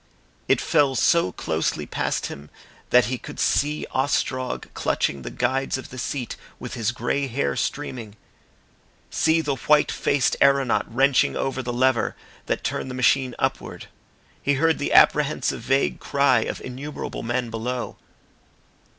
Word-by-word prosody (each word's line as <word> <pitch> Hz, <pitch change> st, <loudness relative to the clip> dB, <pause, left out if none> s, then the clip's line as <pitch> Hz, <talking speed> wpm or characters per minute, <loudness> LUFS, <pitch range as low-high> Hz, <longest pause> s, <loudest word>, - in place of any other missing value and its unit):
It -, -, +3 dB
fell 140 Hz, -3 st, +2 dB
so 170 Hz, -, +3 dB
closely 80 Hz, -2 st, -2 dB
past -, -, -2 dB
him 75 Hz, +1 st, -8 dB, 0.4 s
that 125 Hz, -1 st, +5 dB
he 125 Hz, +2 st, -3 dB
could -, -, -9 dB
see 150 Hz, +1 st, +1 dB
Ostrog 130 Hz, -1 st, -1 dB
clutching 70 Hz, -, -1 dB
the -, -, -6 dB
guides 130 Hz, +2 st, -1 dB
of 130 Hz, -, -9 dB
the 130 Hz, -, -7 dB
seat, 125 Hz, -2 st, -3 dB, 0.2 s
with -, -, -7 dB
his 115 Hz, -1 st, -1 dB
grey 120 Hz, +4 st, -1 dB
hair 70 Hz, -, -1 dB
streaming; 110 Hz, -, -4 dB, 1.0 s
see 160 Hz, 0 st, +2 dB
the 145 Hz, -3 st, -1 dB
white 150 Hz, +2 st, +3 dB
faced 140 Hz, -3 st, +1 dB
aeronaut 135 Hz, -7 st, +3 dB
wrenching 135 Hz, +3 st, +3 dB
over 135 Hz, -1 st, -2 dB
the 125 Hz, -1 st, -4 dB
lever 130 Hz, 0 st, +1 dB, 0.3 s
that -, -, -1 dB
turned -, -, -2 dB
the 125 Hz, -, -5 dB
machine 130 Hz, 0 st, +2 dB
upward. -, -, -3 dB, 0.5 s
He 140 Hz, -, +1 dB
heard 160 Hz, +3 st, +2 dB
the 145 Hz, -, -2 dB
apprehensive 150 Hz, -4 st, +4 dB
vague 135 Hz, +4 st, +1 dB
cry 140 Hz, -3 st, +3 dB
of -, -, -4 dB
innumerable 135 Hz, +4 st, -6 dB
men 120 Hz, 0 st, -2 dB
below. 120 Hz, +2 st, -4 dB
130 Hz, 145 wpm, -24 LUFS, 120-140 Hz, 1.0 s, that